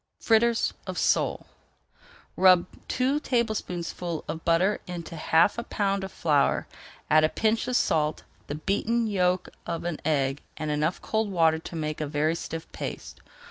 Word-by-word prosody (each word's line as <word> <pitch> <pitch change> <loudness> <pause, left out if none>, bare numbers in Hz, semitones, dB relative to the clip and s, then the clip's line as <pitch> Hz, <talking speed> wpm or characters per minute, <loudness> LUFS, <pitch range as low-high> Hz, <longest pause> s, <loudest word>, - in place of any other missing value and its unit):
FRITTERS 230 0 +3
OF - - -4
SOLE - - +1 0.9
Rub 185 -2 +6 0.2
two 265 +3 +1
tablespoonfuls 180 - -2
of 160 - -5
butter 180 +5 +2
into 170 -2 -6
half 165 +6 +3
a - - -3
pound 195 -3 -1
of 190 - -5
flour, 150 -4 +2 0.5
add 155 0 +6
a 155 - +4
pinch 220 +4 0
of 250 - -1
salt, 155 -8 +1 0.2
the 145 - -4
beaten 220 +8 0
yolk 185 -3 +1 0.2
of 170 -1 -3
an 170 -3 -3
egg, 140 -2 0 0.2
and 155 0 -2
enough 150 +4 -1
cold 220 -1 0
water 165 -4 +3
to 165 - -9
make 155 -1 -3
a 150 - -1
very 150 +2 +1
stiff 165 -1 -5
paste. - - -7
170 Hz, 155 wpm, -27 LUFS, 155-210 Hz, 0.9 s, Rub